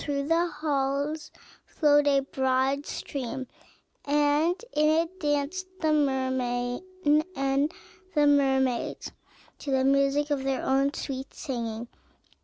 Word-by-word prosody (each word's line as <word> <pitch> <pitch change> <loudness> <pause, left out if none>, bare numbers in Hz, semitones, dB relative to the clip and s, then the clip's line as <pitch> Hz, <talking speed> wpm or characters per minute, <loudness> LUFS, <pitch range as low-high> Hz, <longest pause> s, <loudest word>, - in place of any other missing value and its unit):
Through 280 0 -2
the 335 +1 +3
halls 295 -1 -2 0.3
flowed 290 -2 +3
a 275 -1 +4
broad 265 +1 0
stream, 260 -1 -4 0.6
and 295 +4 +2 0.2
in 305 0 +3
it 365 +3 -13
danced 295 +5 -1
the 315 -2 +2
mermen 260 -4 0 0.5
and 275 +2 +1 0.4
the 295 -1 +4
mermaids 265 -3 +1 0.5
to 290 - -6
the 265 -1 +2
music 275 +2 +2
of 275 -2 0
their 270 -1 -1
own 275 +1 +2
sweet 270 -2 -5
singing. 235 -4 -4
280 Hz, 115 wpm, -27 LUFS, 265-295 Hz, 0.6 s, a